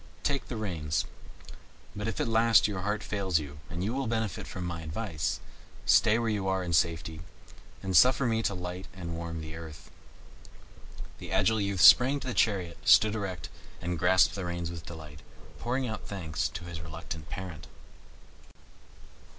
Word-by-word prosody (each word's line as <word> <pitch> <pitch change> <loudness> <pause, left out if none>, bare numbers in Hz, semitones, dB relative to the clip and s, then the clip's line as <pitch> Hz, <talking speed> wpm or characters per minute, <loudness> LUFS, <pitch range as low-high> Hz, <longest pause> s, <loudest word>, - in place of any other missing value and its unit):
Take 140 -1 -1
the 120 - -4
reins; 80 -7 -1 0.9
but 105 +1 -3
if 115 - -3
at - - +1
last 115 -1 +5
your 100 -3 -3
heart 105 +2 -1
fails 95 -5 0
you, 75 -1 -5
and 85 +1 -4
you 110 +4 -1
will 135 -1 -1
benefit 110 -3 -2
by - - -6
my 85 -2 -4
advice, 80 -1 -3 0.5
stay 105 - +5
where 115 -1 0
you 105 -3 -1
are 95 -1 +1
in 85 -1 -3
safety, 80 -1 +1 0.6
and 95 -1 -1
suffer 130 +6 +6
me 115 -1 +1
to 100 - -1
light 90 +1 -6
and 85 -3 -5
warm 85 -1 -5
the 80 0 -7
earth." 80 -2 -10 1.3
The - - -8
agile 110 -1 +3
youth 100 -2 -1
sprang 125 +8 +9
into 140 - -5
the - - -2
chariot, 95 -8 +1
stood 110 -1 +6
erect, 95 -7 -4 0.3
and 85 -1 -3
grasped 95 +2 +5
the 95 -2 -4
reins 85 -1 -3
with 85 -2 -8
delight, 75 -3 -9 0.4
pouring 125 +2 -1
out 110 -2 -5
thanks 80 -5 -2
to - - -7
his 85 -2 -7
reluctant 80 0 -7
parent. 90 -4 -7
90 Hz, 170 wpm, -29 LUFS, 85-110 Hz, 1.3 s, sprang